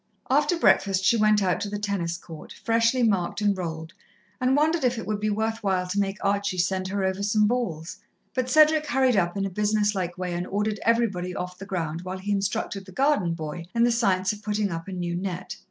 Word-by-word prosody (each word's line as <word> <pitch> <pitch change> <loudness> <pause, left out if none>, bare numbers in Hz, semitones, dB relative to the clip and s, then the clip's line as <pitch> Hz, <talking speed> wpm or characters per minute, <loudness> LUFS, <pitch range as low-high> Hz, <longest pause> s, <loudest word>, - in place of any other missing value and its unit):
After 295 +5 +3
breakfast 195 - +3
she 235 - +5
went 215 -2 +3
out 180 -2 +1
to 205 - -2
the 205 - -3
tennis 195 -5 -2
court, 165 -3 -11
freshly 230 +2 +3
marked 195 -6 +1
and 205 -1 +2
rolled, 165 -2 -5 0.5
and 255 +1 +2
wondered 315 +1 +2
if 250 -1 +2
it 225 - -5
would 210 -1 -2
be 215 +1 0
worth 220 +2 -1
while 190 -3 0
to 185 +3 -2
make 195 0 -1
Archie 200 -1 0
send 185 +1 0
her 195 +1 -2
over 190 +1 -1
some 210 +1 +2
balls, 195 -9 -2 0.4
but 255 -1 -1
Cedric 310 +2 +5
hurried 265 -3 +2
up 175 -1 +1
in 195 - 0
a - - -2
business 210 +1 +1
like 180 -3 -3
way 180 -1 -3
and 175 +1 -3
ordered 210 +1 -1
everybody 200 -6 +1
off 180 -1 -5
the 195 - -8
ground 165 -4 -3
while 185 +1 -5
he 195 +2 -4
instructed 195 0 -2
the - - -10
garden 205 - +1
boy 160 +1 -6
in 235 - +4
the 240 - +4
science 190 -5 +1
of 210 - -10
putting 210 -2 -1
up 165 +1 -5
a - - -6
new 175 -2 -3
net. 185 0 -4
200 Hz, 225 wpm, -25 LUFS, 180-220 Hz, 0.5 s, she